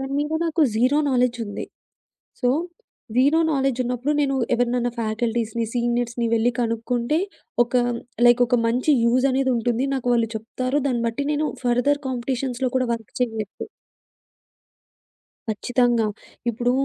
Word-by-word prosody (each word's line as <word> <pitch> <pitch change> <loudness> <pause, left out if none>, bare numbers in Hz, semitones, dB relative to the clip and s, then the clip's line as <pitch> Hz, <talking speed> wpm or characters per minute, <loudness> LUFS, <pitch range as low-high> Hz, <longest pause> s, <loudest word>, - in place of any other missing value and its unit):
దాని 270 +1 -4
మీద 295 +2 -2
నాకు 325 0 -1 0.2
0 255 +6 +3
నాలెడ్జ్ 250 -1 +1
ఉంది. 205 - -5 0.8
సో 250 - +2 0.7
0 285 +5 +4
నాలెడ్జ్ 270 -2 0
ఉన్నప్పుడు 250 +4 -1
నేను 275 -1 +1 0.2
ఎవరినన్నా 245 0 +1
ఫ్యాకల్టీస్‌ని, 230 0 -1
సీనియర్స్‌ని 240 -1 0
వెళ్లి 230 +2 +3
కనుక్కుంటే 235 +4 0 0.4
ఒక 240 +1 -6 0.5
లైక్ 240 +1 +6
ఒక 245 0 +2
మంచి 250 +6 +2
యూజ్ 250 +3 +3
అనేదుంటుంది. 250 -1 +1
నాకు 255 -2 -4
వాళ్ళు 230 -2 +2
చెప్తారు. 255 +5 -2
దాన్ని 240 -4 0
బట్టి 235 +5 -3
నేను 300 +1 0 0.2
ఫర్‌దర్ 245 +4 +2
కాంపిటీషన్స్‌లో 255 0 -2
కూడా 255 - +1
వర్క్ 225 -6 -10
చెయ్యొచ్చు. 220 -4 -3 1.8
ఖచ్చితంగా. 240 +1 +1 0.4
ఇప్పుడు 240 +2 0
245 Hz, 125 wpm, -23 LUFS, 235-260 Hz, 1.8 s, లైక్